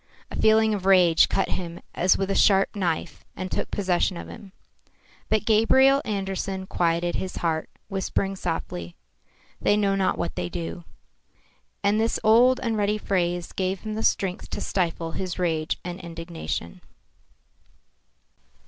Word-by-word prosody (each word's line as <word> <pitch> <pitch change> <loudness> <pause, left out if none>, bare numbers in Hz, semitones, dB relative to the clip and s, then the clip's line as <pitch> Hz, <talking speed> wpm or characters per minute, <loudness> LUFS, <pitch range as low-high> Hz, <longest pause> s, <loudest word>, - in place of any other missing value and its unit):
A - - -5
feeling 220 0 +4
of 195 -2 -3
rage 180 -4 +5
cut 195 - 0
him 170 -2 -4
as 180 +1 +3
with 195 0 -1
a - - 0
sharp 195 -1 +4
knife 175 -5 -2
and 185 0 -5
took - - -2
possession 185 -2 0
of - - -7
him. 200 -2 -11 0.8
But 215 -1 +1
Gabriel 265 +5 +5
Andersen 195 -2 -3
quieted 175 -1 0
his 185 - -4
heart, 160 -2 -1 0.2
whispering 195 0 -2
softly, 90 - -4 0.7
"They 205 - +3
know 200 -2 +2
not 195 -1 +1
what 170 - -3
they 90 0 -3
do." 85 0 -6 1.0
And 205 +2 +3
this 225 - 0
old 240 +4 +5
and 230 -3 0
ready 210 0 +1
phrase 175 -4 -1
gave 190 0 -2
him 215 -1 -5
the 220 - -3
strength 190 -4 0
to - - -4
stifle 165 -3 -1
his 180 +2 -4
rage 160 -3 0
and 180 0 -5
indignation. 165 - -6
190 Hz, 150 wpm, -25 LUFS, 170-205 Hz, 1.0 s, rage